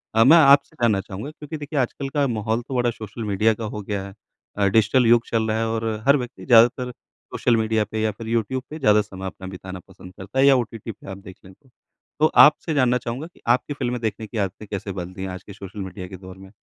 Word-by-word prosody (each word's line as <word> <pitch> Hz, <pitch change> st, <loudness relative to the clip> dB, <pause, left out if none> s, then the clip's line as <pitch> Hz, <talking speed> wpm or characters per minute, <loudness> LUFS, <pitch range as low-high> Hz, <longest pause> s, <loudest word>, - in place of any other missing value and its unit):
अ, 115 Hz, -, +6 dB
मैं 160 Hz, +7 st, +8 dB
आपसे 140 Hz, -2 st, +5 dB
जानना 110 Hz, -5 st, +3 dB
चाहूँगा 100 Hz, +10 st, -7 dB
क्योंकि 155 Hz, 0 st, -8 dB
देखिए 145 Hz, 0 st, -3 dB
आजकल 135 Hz, +2 st, -2 dB
का 145 Hz, 0 st, +1 dB
माहौल 110 Hz, -1 st, -1 dB
तो 135 Hz, -, -5 dB
बड़ा 120 Hz, -1 st, +2 dB
सोशल 110 Hz, 0 st, -8 dB
मीडिया 105 Hz, +2 st, +2 dB
का 110 Hz, +1 st, -6 dB
हो 105 Hz, -, -4 dB
गया 100 Hz, -1 st, -4 dB
है 100 Hz, -, -11 dB, 0.4 s
अ, 100 Hz, -, +2 dB
डिजिटल 110 Hz, +4 st, +3 dB
युग 115 Hz, 0 st, +5 dB
चल 115 Hz, -1 st, +1 dB
रहा 110 Hz, 0 st, 0 dB
है 115 Hz, 0 st, 0 dB
और 115 Hz, 0 st, -2 dB, 0.2 s
हर 140 Hz, +1 st, +6 dB
व्यक्ति 125 Hz, -2 st, -7 dB
ज़्यादातर 125 Hz, +1 st, +5 dB, 0.4 s
सोशल 120 Hz, -2 st, +1 dB
मीडिया 110 Hz, -1 st, +1 dB
पे 110 Hz, 0 st, -2 dB
या 110 Hz, -, +1 dB
फिर 110 Hz, +3 st, -10 dB
यूट्यूब 115 Hz, +3 st, -1 dB
पे 155 Hz, -, -7 dB
ज़्यादा 105 Hz, -6 st, +4 dB
समय 95 Hz, -2 st, -9 dB
अपना 95 Hz, 0 st, -7 dB
बिताना 95 Hz, 0 st, -8 dB
पसंद 90 Hz, 0 st, -14 dB
करता 100 Hz, +7 st, -5 dB
है 135 Hz, -, +6 dB
या 140 Hz, -1 st, +7 dB
ओटीटी 115 Hz, -2 st, -3 dB
पे 100 Hz, -, -16 dB
आप 95 Hz, -, -7 dB
देख 95 Hz, -2 st, -12 dB
लें 95 Hz, -, -14 dB
तो। 135 Hz, +5 st, -28 dB, 0.5 s
तो 155 Hz, -, +5 dB, 0.2 s
आपसे 155 Hz, +2 st, +4 dB
जानना 125 Hz, -4 st, +3 dB
चाहूँगा 125 Hz, +6 st, -5 dB
कि 175 Hz, -, -24 dB
आपकी 125 Hz, +4 st, +2 dB
फ़िल्में 125 Hz, -3 st, -3 dB
देखने 110 Hz, -1 st, -3 dB
की 115 Hz, -, -7 dB
आदतें 100 Hz, +1 st, -3 dB
कैसे 100 Hz, 0 st, -4 dB
बदल 90 Hz, -1 st, -6 dB
दी 95 Hz, -, -9 dB
हैं? 95 Hz, -, -4 dB
आज 90 Hz, 0 st, -8 dB
के 100 Hz, -, -11 dB
सोशल 100 Hz, +1 st, -10 dB
मीडिया 95 Hz, 0 st, -7 dB
के 95 Hz, 0 st, -9 dB
दौर 95 Hz, 0 st, -12 dB
में? 95 Hz, 0 st, -14 dB
110 Hz, 250 wpm, -23 LUFS, 100-125 Hz, 0.5 s, मैं